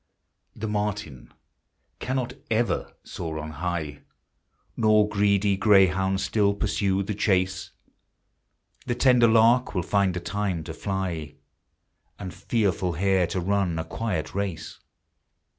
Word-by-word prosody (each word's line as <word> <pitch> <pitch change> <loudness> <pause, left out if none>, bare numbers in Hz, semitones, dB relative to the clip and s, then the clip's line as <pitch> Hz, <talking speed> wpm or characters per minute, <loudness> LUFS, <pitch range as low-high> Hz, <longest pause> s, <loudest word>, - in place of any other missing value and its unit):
The 110 - -4
merlin 105 - -4 0.7
cannot 130 -1 -2 0.2
ever 115 +1 0
soar 80 -2 -6
on 75 0 -6
high, 80 -2 -4 0.7
Nor 110 -1 +4
greedy 100 -1 +2
greyhound 95 -1 +3
still 100 -1 +1
pursue 100 -2 0
the 105 +2 -3
chase; 95 -2 0 1.2
The 120 - 0
tender 125 -2 +5
lark 115 +2 +4
will 90 - 0
find 100 -2 +1
a - - -1
time 90 -1 -2
to 80 - -7
fly. 85 -5 -4 0.8
And 95 -3 -7
fearful 95 -6 -1
hare 95 +1 +2
to 90 +2 -3
run 95 -2 0
a 80 - -3
quiet 95 -3 -3
race. 100 -4 -4
95 Hz, 120 wpm, -25 LUFS, 90-105 Hz, 1.2 s, tender